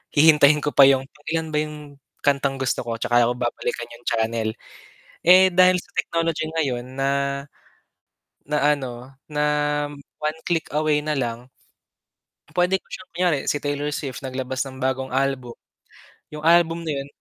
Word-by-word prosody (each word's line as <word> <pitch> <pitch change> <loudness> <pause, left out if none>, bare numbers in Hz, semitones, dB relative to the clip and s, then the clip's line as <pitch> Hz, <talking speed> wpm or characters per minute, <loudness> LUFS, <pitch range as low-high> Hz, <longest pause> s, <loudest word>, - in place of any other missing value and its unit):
Hihintayin 150 -1 +6
ko 150 - 0
pa 140 -2 +7
'yung, 135 -1 +4 0.2
ilan 160 -1 -2
ba 150 - -1
'yung 150 -2 -6 0.2
kantang 140 -1 +1
gusto 130 -2 -2
ko 115 - -2
'tsaka 120 +1 +2
ko 120 - -1
babalikan 120 -1 -3
'yung 120 +1 -14
channel. 110 0 0 0.8
Eh, 185 +2 +8
dahil 185 0 +4
sa - - -22
technology 165 -1 0
ngayon 130 -7 -1
na 135 +1 0 1.4
na 150 0 +3
ano 130 -2 -8 0.2
na 150 0 -1 0.8
one 155 +1 -2
click 165 -2 0
away 150 0 +2
na 155 - -1
lang. 120 -3 -3 1.1
Puwede 180 +1 +2
ko - - -37
siyang 215 - -9
kunyari 175 -3 +1
si 145 - 0
Taylor 145 +1 -2
Swift 140 -2 -5
naglabas 130 0 -3
ng 130 -1 -8
bagong 130 0 -2
album, 130 -2 -1 0.8
'yung 150 - -7
album 170 0 +4
na 165 - -3
'yon 135 - -5
145 Hz, 155 wpm, -23 LUFS, 130-155 Hz, 1.4 s, Eh